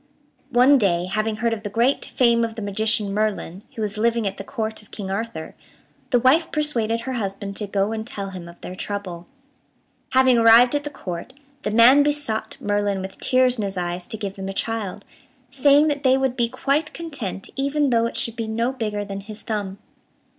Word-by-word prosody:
One 260 Hz, +2 st, +5 dB
day, 175 Hz, -5 st, +2 dB
having 215 Hz, +3 st, -1 dB
heard 230 Hz, +1 st, 0 dB
of 220 Hz, -, -4 dB
the 210 Hz, -, -5 dB
great 235 Hz, +6 st, +1 dB
fame 235 Hz, -2 st, +3 dB
of 225 Hz, -1 st, -3 dB
the 220 Hz, -, -5 dB
magician 210 Hz, 0 st, 0 dB
Merlin, 205 Hz, -3 st, -2 dB
who 220 Hz, -, -3 dB
was 210 Hz, 0 st, -3 dB
living 230 Hz, 0 st, +1 dB
at 195 Hz, 0 st, -2 dB
the -, -, -6 dB
Court 220 Hz, -1 st, -4 dB
of 210 Hz, -, -21 dB
King 195 Hz, -3 st, -6 dB
Arthur, 200 Hz, -5 st, -4 dB, 0.6 s
the 250 Hz, -, +4 dB
wife 275 Hz, +7 st, +3 dB
persuaded 230 Hz, -7 st, 0 dB
her 260 Hz, +2 st, -4 dB
husband 200 Hz, -3 st, -4 dB
to 210 Hz, -, -2 dB
go 200 Hz, +1 st, 0 dB
and 220 Hz, -1 st, -3 dB
tell 200 Hz, -4 st, -5 dB
him 175 Hz, -2 st, -8 dB
of 170 Hz, -, -15 dB
their 180 Hz, -, -7 dB
trouble. 185 Hz, -3 st, -5 dB, 0.9 s
Having 260 Hz, -2 st, +5 dB
arrived 230 Hz, +2 st, +7 dB
at 290 Hz, 0 st, 0 dB
the -, -, -2 dB
Court, 185 Hz, -4 st, -7 dB, 0.3 s
the -, -, -2 dB
man 235 Hz, +6 st, +7 dB
besought 290 Hz, -7 st, -1 dB
Merlin 205 Hz, -1 st, 0 dB
with 190 Hz, -, -8 dB
tears 255 Hz, -2 st, +3 dB
in -, -, 0 dB
his 195 Hz, -1 st, -3 dB
eyes 175 Hz, 0 st, -3 dB
to 220 Hz, -, -5 dB
give 200 Hz, -1 st, -5 dB
them 195 Hz, 0 st, -5 dB
a -, -, -4 dB
child, 210 Hz, -2 st, -3 dB, 0.5 s
saying 285 Hz, +2 st, +5 dB
that 285 Hz, -1 st, -2 dB
they 260 Hz, -2 st, +4 dB
would 265 Hz, -2 st, 0 dB
be 235 Hz, -2 st, +1 dB
quite 290 Hz, +5 st, 0 dB
content 275 Hz, -, -6 dB
even 280 Hz, 0 st, +1 dB
though 230 Hz, -1 st, +3 dB
it -, -, -6 dB
should 230 Hz, -, -2 dB
be 225 Hz, -1 st, -3 dB
no 230 Hz, +3 st, 0 dB
bigger 210 Hz, -5 st, -3 dB
than 195 Hz, -1 st, -5 dB
his 210 Hz, +2 st, -10 dB
thumb. 205 Hz, -3 st, -3 dB
220 Hz, 205 wpm, -23 LUFS, 200-255 Hz, 0.9 s, arrived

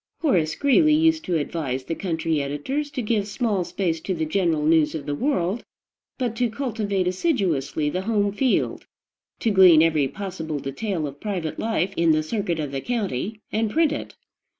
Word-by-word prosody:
Horace 170 Hz, -, +2 dB
Greeley 300 Hz, -, +4 dB
used 320 Hz, 0 st, +3 dB
to 175 Hz, -2 st, +1 dB
advise 145 Hz, -4 st, -3 dB
the 165 Hz, -, -3 dB
country 160 Hz, -3 st, -1 dB
editors 150 Hz, -, -3 dB
to 265 Hz, -4 st, -4 dB
give 210 Hz, -2 st, 0 dB
small 210 Hz, -3 st, 0 dB
space 170 Hz, -1 st, -2 dB
to 185 Hz, +3 st, -3 dB
the 160 Hz, -1 st, -1 dB
general 160 Hz, -2 st, +1 dB
news 160 Hz, -1 st, +3 dB
of 145 Hz, -3 st, -5 dB
the 145 Hz, -, -2 dB
world, 200 Hz, -, 0 dB, 0.5 s
but 245 Hz, -4 st, -2 dB
to 245 Hz, -2 st, +1 dB
cultivate 215 Hz, -7 st, -2 dB
assiduously 180 Hz, -, 0 dB
the 180 Hz, +5 st, -1 dB
home 205 Hz, -1 st, +1 dB
field, 250 Hz, +5 st, 0 dB, 0.5 s
to 225 Hz, -, +2 dB
glean 180 Hz, -5 st, +7 dB
every 155 Hz, -4 st, +2 dB
possible 170 Hz, -3 st, -5 dB
detail 155 Hz, +5 st, -3 dB
of 140 Hz, 0 st, -7 dB
private 180 Hz, -7 st, -3 dB
life 200 Hz, -4 st, 0 dB
in 165 Hz, -1 st, +3 dB
the 155 Hz, 0 st, +1 dB
circuit 175 Hz, -1 st, -2 dB
of 145 Hz, -3 st, -3 dB
the 135 Hz, -1 st, -3 dB
county, 215 Hz, -, -3 dB
and 220 Hz, 0 st, 0 dB
print 315 Hz, +5 st, +2 dB
it. -, -, -5 dB
185 Hz, 175 wpm, -24 LUFS, 155-225 Hz, 0.5 s, glean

